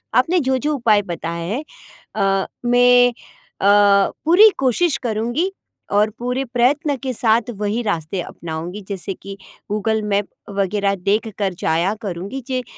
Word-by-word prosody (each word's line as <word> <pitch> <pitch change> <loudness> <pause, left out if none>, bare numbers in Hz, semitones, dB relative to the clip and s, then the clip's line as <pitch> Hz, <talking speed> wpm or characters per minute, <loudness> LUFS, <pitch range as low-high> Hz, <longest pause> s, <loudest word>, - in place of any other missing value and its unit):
आपने 360 +1 +3
जो-जो 265 +1 0
उपाय 220 -6 +3
बताएँ 170 -2 -5
हैं 260 +7 -2 0.8
अ, - - -8 0.2
मैँ 245 0 +5 0.5
अ, 200 0 +5
पूरी 370 +7 +7
कोशिश 270 +3 +1
करूंँगी 240 - -1 0.4
और 210 +1 +3
पूरे 250 +2 -2
प्रयत्न 265 +5 +1
के 260 -1 -2
साथ 230 0 +2
वही 210 +3 -1
रास्ते 180 -3 -2
अपनाऊँगी। 170 +4 -6
जैसे 195 0 -4
कि 195 +1 -10 0.3
गूगल 220 +1 0
मैप 205 -1 0 0.3
वगैरह 200 +1 +1
देखकर 200 +1 -1
जाया 170 +5 +1
करूँगी 200 +5 -5
जे 255 -1 -2
215 Hz, 130 wpm, -20 LUFS, 195-250 Hz, 0.8 s, पूरी